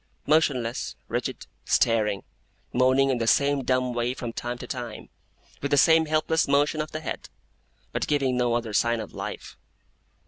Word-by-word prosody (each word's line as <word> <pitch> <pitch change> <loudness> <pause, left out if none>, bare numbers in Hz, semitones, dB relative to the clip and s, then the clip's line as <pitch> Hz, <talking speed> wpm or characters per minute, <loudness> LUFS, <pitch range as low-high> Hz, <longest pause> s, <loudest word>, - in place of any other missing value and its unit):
Motionless, 130 -6 +1
rigid, - - -3 0.2
staring; 105 -4 +2 0.5
moaning 130 +2 +4
in 125 - 0
the 115 - -1
same 140 +2 +3
dumb 130 0 +1
way 120 +1 -1
from 120 -3 -5
time 120 +1 -4
to - - -8
time, 120 -4 -6 0.5
with 140 - -2
the 145 - +3
same 160 +3 +5
helpless 155 +1 +1
motion 145 +2 +2
of 155 - -5
the 155 - -5
head; - - -5 0.6
but - - -2
giving 135 -4 +1
no 120 -1 +1
other 115 -2 -2
sign 115 +3 +2
of 110 - -7
life. - - -7
130 Hz, 165 wpm, -26 LUFS, 120-145 Hz, 0.6 s, same